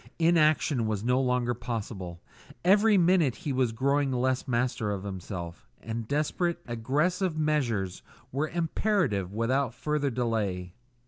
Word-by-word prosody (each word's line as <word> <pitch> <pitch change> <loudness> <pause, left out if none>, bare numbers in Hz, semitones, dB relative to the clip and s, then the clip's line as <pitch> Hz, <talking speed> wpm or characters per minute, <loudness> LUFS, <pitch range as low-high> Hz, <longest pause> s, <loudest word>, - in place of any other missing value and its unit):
Inaction 155 -7 +3
was 105 -2 -2
no 125 +2 +2
longer 125 -1 +1
possible; 105 -7 -5 0.4
every 205 +3 +5
minute 170 -7 +3
he 145 - -4
was 130 -3 +1
growing 140 +4 +1
less 130 +1 0
master 120 -3 0
of 100 -2 -3
himself, 90 -3 -6
and 115 0 -5
desperate, 155 +5 0
aggressive 150 - 0
measures 125 -12 0 0.3
were 145 +4 -1
imperative 165 - 0
without 120 +3 0
further 150 +1 0
delay. 105 -8 -2
125 Hz, 125 wpm, -28 LUFS, 110-150 Hz, 0.4 s, every